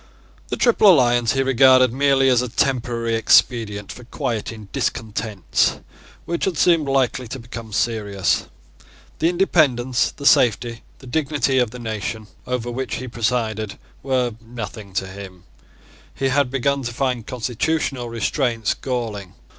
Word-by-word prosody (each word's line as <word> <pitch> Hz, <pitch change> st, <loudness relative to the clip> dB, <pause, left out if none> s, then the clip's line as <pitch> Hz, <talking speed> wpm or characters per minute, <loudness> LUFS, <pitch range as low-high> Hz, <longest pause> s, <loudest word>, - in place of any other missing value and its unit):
The -, -, -3 dB
Triple 225 Hz, -4 st, +5 dB
Alliance 120 Hz, -6 st, +3 dB
he 135 Hz, 0 st, +1 dB
regarded 130 Hz, -1 st, +5 dB
merely 135 Hz, 0 st, +3 dB
as 125 Hz, -2 st, +4 dB
a 125 Hz, -, -3 dB
temporary 120 Hz, -2 st, -1 dB
expedient 110 Hz, -2 st, +2 dB
for 125 Hz, -, -11 dB
quieting 115 Hz, -5 st, -4 dB
discontents 110 Hz, -3 st, -1 dB, 0.5 s
which 170 Hz, -, -2 dB
had 185 Hz, -5 st, -2 dB
seemed 165 Hz, -4 st, +3 dB
likely 130 Hz, -2 st, 0 dB
to 135 Hz, -, -6 dB
become 115 Hz, -2 st, -9 dB
serious. 100 Hz, -3 st, 0 dB, 0.7 s
The 165 Hz, -, +3 dB
independence, 140 Hz, -9 st, +2 dB
the 140 Hz, -, -10 dB
safety, 120 Hz, -2 st, +3 dB, 0.2 s
the -, -, -15 dB
dignity 140 Hz, -1 st, 0 dB
of 125 Hz, -3 st, +2 dB
the 125 Hz, -, -10 dB
nation 110 Hz, -1 st, -4 dB, 0.2 s
over 125 Hz, -1 st, -2 dB
which 130 Hz, +1 st, -3 dB
he 130 Hz, -, -6 dB
presided 110 Hz, -3 st, -2 dB, 0.2 s
were 130 Hz, -3 st, 0 dB
nothing 110 Hz, -4 st, -8 dB
to 95 Hz, -, -1 dB
him. 95 Hz, -1 st, -10 dB, 0.7 s
He 135 Hz, -, 0 dB
had 140 Hz, 0 st, +2 dB
begun 140 Hz, +1 st, 0 dB
to 120 Hz, -2 st, -4 dB
find 125 Hz, -4 st, -1 dB
constitutional 125 Hz, +1 st, -2 dB
restraints 115 Hz, -1 st, -1 dB
galling. 110 Hz, -8 st, -4 dB
120 Hz, 140 wpm, -21 LUFS, 115-135 Hz, 0.7 s, Triple